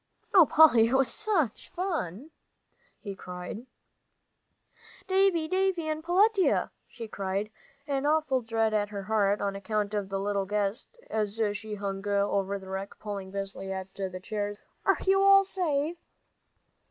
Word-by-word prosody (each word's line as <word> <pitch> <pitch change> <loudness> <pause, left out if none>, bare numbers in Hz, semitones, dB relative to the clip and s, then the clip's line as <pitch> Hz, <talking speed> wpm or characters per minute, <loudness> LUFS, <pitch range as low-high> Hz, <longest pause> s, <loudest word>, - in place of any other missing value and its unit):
"Oh, 360 -6 +8
Polly, 245 -8 +6
it 250 - +1
was 265 -3 +2
such 375 - -1
fun!" 315 - -3 0.7
he 200 - -5
cried. 180 +6 -8 1.4
"Davie! 375 -4 +3
Davie 370 -2 0
and 310 0 -3
Peletiah!" 390 +3 +3 0.4
cried 195 +2 -3 0.3
Polly, 280 -1 -1
an 285 - -1
awful 300 -4 +2
dread 225 -1 0
at 205 -1 +1
her 200 -1 -5
heart, 205 -1 +1
on 200 -1 -1
account 205 +1 -2
of 205 -2 -2
the 195 0 -2
little 200 -1 -1
guest, 210 - -2
as 215 0 -2 0.2
she 215 +1 -5
hung 200 0 -4
over 200 -1 +1
the 190 -1 -11
wreck, 190 +1 -5
pulling 200 -3 -6
busily 195 0 -5
at 190 0 -5
the 190 -2 -5
chairs, 205 +1 -4 0.3
"are - - +4
you 390 0 +4
all 395 0 +7
safe?" 340 -4 -1
215 Hz, 145 wpm, -28 LUFS, 200-315 Hz, 1.4 s, Oh